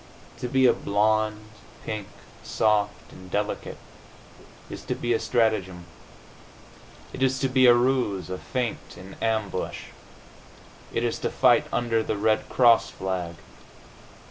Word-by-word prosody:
To 125 - -3
be 130 +1 +3
a 125 - +6
blonde, 105 +1 0 0.4
pink, 105 -2 -4 0.3
soft 105 -1 0
and 95 0 -13
delicate, 105 +2 -3 0.9
is - - -8
to - - -2
be 120 0 -1
a 115 - +1
strategem. 110 -7 0 1.3
It - - -7
is 130 0 +2
to 135 - 0
be 130 -1 +4
a 120 - +8
ruse, 120 -7 0
a 90 - -4
feint, 125 -3 -4
an 95 +2 -11
ambush. 110 -4 -2 1.0
It - - -1
is - - -1
to - - -2
fight - - +3
under 115 -2 0
the 110 - -3
Red 110 +1 +1
Cross 120 -3 +4
flag. 90 -3 -4
110 Hz, 135 wpm, -25 LUFS, 100-120 Hz, 1.3 s, a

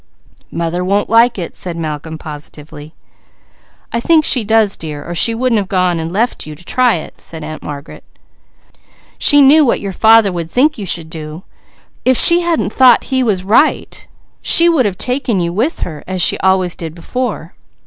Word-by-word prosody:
"Mother 170 +1 -3
won't 200 +3 -1
like 230 +1 +4
it," 175 -3 -6
said 175 -2 -5
Malcolm 160 0 -5
positively. 150 0 -11 1.0
"I 235 - 0
think 315 +4 +2
she 245 - +1
does 220 -1 +1
dear, 150 -2 -8
or 175 - -5
she 225 +6 +1
wouldn't 240 -2 0
have 195 - -4
gone 180 -3 0
and 160 +1 -5
left 220 -2 -2
you 155 - -8
to 175 +4 -18
try 250 +1 +2
it," 160 - -9
said 160 -2 -8
Aunt 155 +1 -8
Margaret. 140 -1 -9 1.2
"She 290 -1 +5
knew 300 +3 +6
what 250 - +1
your 200 - -5
father 220 +1 +4
would 170 -2 -5
think 285 - +1
you 200 - -6
should 165 -2 -5
do; 155 +1 -9 0.6
if 255 -1 +2
she 340 +1 +7
hadn't 320 - -1
thought 255 -2 +5
he 260 - +2
was 205 -7 -1
right 220 +10 0 0.3
she 335 - +4
would 305 -9 +2
have 190 -3 -5
taken 250 -5 -1
you 170 -1 -2
with 235 - -2
her, 155 -4 -6
as 185 -2 +2 0.6
before." 185 -1 -5
195 Hz, 175 wpm, -14 LUFS, 165-245 Hz, 1.2 s, she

